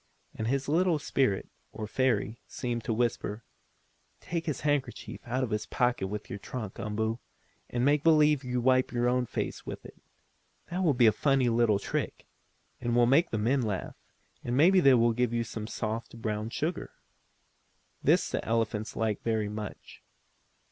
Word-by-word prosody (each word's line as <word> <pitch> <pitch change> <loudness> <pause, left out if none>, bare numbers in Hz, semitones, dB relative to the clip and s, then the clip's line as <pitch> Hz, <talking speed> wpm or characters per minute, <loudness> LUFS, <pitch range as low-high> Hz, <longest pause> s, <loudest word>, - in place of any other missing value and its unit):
And 110 - -3
this 135 +2 0
little 170 +2 +3
spirit, 130 -8 0 0.2
or 110 - -5
fairy, 115 -1 0
seemed 120 -2 -3
to - - -1
whisper: 115 -1 -1 0.8
"Take 170 -1 -4
his 150 - -2
handkerchief 145 -4 -2
out 125 +2 0
of 120 - -3
his 105 0 -2
pocket 125 -6 0
with 105 +1 -5
your 100 - -6
trunk, 110 -2 -6
Umboo, 110 +2 -2 0.5
and 120 +1 0
make 145 +1 +3
believe 150 -3 +5
wipe 125 +1 +2
your 120 0 +1
own 125 0 +1
face - - -4
with - - -7
it. - - -13 0.7
That 180 +2 -1
will 155 -6 +3
be 120 -1 +5
a 110 - +7
funny 135 0 +2
little 115 -3 +3
trick, 100 - -3 0.5
and 120 -1 -1
will 120 0 +5
make 140 +8 +4
the 110 - -2
men 125 +6 +2
laugh, 105 -5 -3 0.5
and 120 +1 -1
maybe 185 +6 +6
they 135 -6 +6
will 115 -1 +4
give 120 0 0
you 115 0 +1
some 110 -1 -6
soft, 115 +1 -4
brown 110 0 -2
sugar." 155 +8 -3 1.1
This - - +3
the - - -1
elephants 115 -1 -1
like 110 -2 -1
very 110 -2 0
much. 105 -1 -8
120 Hz, 170 wpm, -29 LUFS, 110-135 Hz, 1.1 s, a